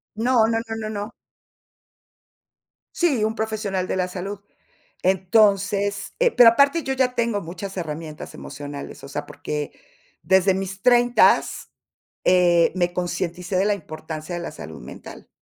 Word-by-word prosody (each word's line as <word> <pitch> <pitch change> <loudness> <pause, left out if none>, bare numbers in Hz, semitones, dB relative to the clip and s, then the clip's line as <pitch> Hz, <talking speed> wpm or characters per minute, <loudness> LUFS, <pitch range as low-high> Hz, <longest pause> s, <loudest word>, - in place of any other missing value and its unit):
No, 230 0 +3
no, 225 0 +1
no, 225 - -3
no, 215 -1 -4
no. 210 +1 -5 1.8
Sí, 285 -11 +2
un 220 +1 0
profesional 210 -4 -2
de - - -2
la 185 -1 0
salud. 195 +2 -6 0.6
Entonces 200 +1 +2
eh, - - +4
pero, 235 -2 +8
aparte 280 +7 +3
yo 265 0 -2
ya 255 -1 +1
tengo 230 -5 0
muchas 185 +4 -7
herramientas 155 -2 -6
emocionales, 145 -1 -8
o - - -9
sea, 145 +1 -5
porque 150 0 -5 0.5
desde 190 0 +4
mis 190 0 -4
treintas, 245 0 +3 0.5
eh, 175 -2 +4
me 175 -1 0
concienticé 180 +1 -3
de 190 - +2
la 210 - +3
importancia 155 -1 -7
de 175 - -3
la 170 - -5
salud 80 - -9
mental. - - -11
195 Hz, 145 wpm, -23 LUFS, 175-220 Hz, 1.8 s, pero